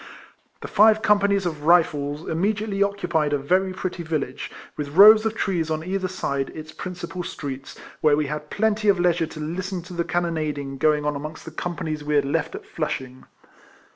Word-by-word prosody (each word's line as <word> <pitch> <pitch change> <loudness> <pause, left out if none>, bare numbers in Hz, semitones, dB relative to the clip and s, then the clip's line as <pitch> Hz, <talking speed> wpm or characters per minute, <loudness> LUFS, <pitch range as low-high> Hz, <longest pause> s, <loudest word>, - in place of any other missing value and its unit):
The - - -6
five 215 +1 +5
com 210 -1 +5
panies 200 -1 +1
of 165 -3 -2
Kifles 150 -2 +2
immediately 200 +4 -1
occupied 175 -7 +1
a - - +3
very 185 +7 +1
pretty 185 -1 -4
village, 155 -5 -3 0.3
with 145 0 -5
rows 215 +2 +9
of 220 - -3
trees 175 -6 -1
on 155 0 -2
either 190 +1 -2
side 140 -7 -2
its 155 0 -8
principal 180 +1 -6
streets, 135 -5 -6 0.2
where 150 -2 +4
we 150 - +1
had 150 +1 -5
plenty 215 0 +1
of 195 -3 +4
leisure 175 -2 +2
to 155 - -10
listen 180 +4 -4
to 180 +1 -10
the 170 -1 -1
cannon 170 -1 -1
ading 145 -3 -4
going 150 0 +2
on 150 0 0
amongst 155 +2 -7
the 165 - -8
companies 160 -2 -4
we 150 0 -1
had 145 -1 +3
left 150 +2 -1
at - - -8
Flushing. 130 -5 -5
165 Hz, 190 wpm, -23 LUFS, 150-190 Hz, 0.3 s, rows